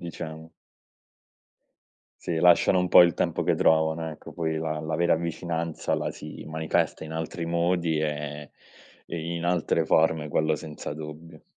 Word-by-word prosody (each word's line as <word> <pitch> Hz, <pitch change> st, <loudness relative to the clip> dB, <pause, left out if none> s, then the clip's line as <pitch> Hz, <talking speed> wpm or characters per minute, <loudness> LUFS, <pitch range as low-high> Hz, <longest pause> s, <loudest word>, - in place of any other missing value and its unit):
diciamo. 80 Hz, -1 st, -7 dB, 1.7 s
Sì, 85 Hz, -, -1 dB
lasciano 90 Hz, +2 st, +5 dB
un 90 Hz, -, +1 dB
po' 90 Hz, -, +8 dB
il 85 Hz, -1 st, +3 dB
tempo -, -, 0 dB
che -, -, +1 dB
trovano, 80 Hz, 0 st, +2 dB
ecco, -, -, -12 dB
poi 80 Hz, -2 st, -2 dB
la 80 Hz, -1 st, -2 dB
la 80 Hz, +1 st, -3 dB
vera 85 Hz, 0 st, +3 dB
vicinanza 85 Hz, 0 st, -3 dB
la -, -, -2 dB
si -, -, -9 dB
manifesta 80 Hz, 0 st, -1 dB
in 80 Hz, -, -7 dB
altri 80 Hz, +1 st, -4 dB
modi 85 Hz, -1 st, +1 dB
e 75 Hz, -1 st, -4 dB, 0.5 s
e 85 Hz, -, -5 dB, 0.2 s
in 85 Hz, 0 st, -4 dB
altre 85 Hz, -2 st, +1 dB
forme, 80 Hz, -1 st, +2 dB
quello 80 Hz, +1 st, +1 dB
senza 75 Hz, -1 st, -7 dB
dubbio. 80 Hz, +1 st, -10 dB
80 Hz, 150 wpm, -26 LUFS, 80-85 Hz, 1.7 s, po